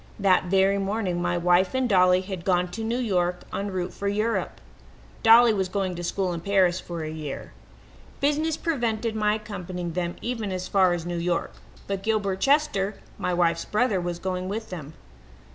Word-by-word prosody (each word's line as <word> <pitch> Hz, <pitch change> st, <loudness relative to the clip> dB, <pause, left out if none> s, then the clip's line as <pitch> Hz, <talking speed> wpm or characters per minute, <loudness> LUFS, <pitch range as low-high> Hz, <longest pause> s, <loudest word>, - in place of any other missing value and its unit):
That 190 Hz, -2 st, +3 dB
very 195 Hz, +2 st, +3 dB
morning 195 Hz, -3 st, -1 dB
my 175 Hz, 0 st, 0 dB
wife 180 Hz, +5 st, +3 dB
and 260 Hz, -1 st, +2 dB
Dolly 185 Hz, -3 st, +4 dB
had 190 Hz, -2 st, -6 dB
gone 180 Hz, -1 st, +1 dB
to 220 Hz, +5 st, -5 dB
New 230 Hz, +2 st, -1 dB
York 180 Hz, -7 st, 0 dB
en 200 Hz, +1 st, -2 dB
route 185 Hz, -2 st, -3 dB
for 200 Hz, -, -4 dB
Europe. 215 Hz, +3 st, -1 dB, 0.6 s
Dolly 230 Hz, 0 st, +7 dB
was 190 Hz, -3 st, -1 dB
going 190 Hz, -1 st, -1 dB
to 175 Hz, 0 st, -6 dB
school 180 Hz, +1 st, -1 dB
in 170 Hz, -, -5 dB
Paris 185 Hz, -1 st, +2 dB
for 170 Hz, -2 st, -6 dB
a 155 Hz, -, -4 dB
year. 155 Hz, -3 st, -6 dB, 0.7 s
Business 300 Hz, +2 st, +1 dB
prevented 230 Hz, -7 st, -1 dB
my 210 Hz, -1 st, +2 dB
accompanying 180 Hz, -5 st, -5 dB
them 175 Hz, 0 st, -2 dB
even 230 Hz, -5 st, -3 dB
as 185 Hz, 0 st, -3 dB
far 190 Hz, -3 st, +3 dB
as 170 Hz, -1 st, -3 dB
New 175 Hz, -1 st, -3 dB
York, 175 Hz, 0 st, -1 dB, 0.3 s
but 195 Hz, -1 st, -3 dB
Gilbert 200 Hz, -3 st, 0 dB
Chester, 270 Hz, -7 st, +2 dB, 0.2 s
my -, -, -1 dB
wife's 170 Hz, -1 st, +1 dB
brother, 215 Hz, -4 st, +1 dB
was 175 Hz, -1 st, -3 dB
going 185 Hz, 0 st, -3 dB
with 220 Hz, +1 st, -5 dB
them. 155 Hz, -3 st, -7 dB
190 Hz, 180 wpm, -25 LUFS, 175-215 Hz, 0.7 s, Dolly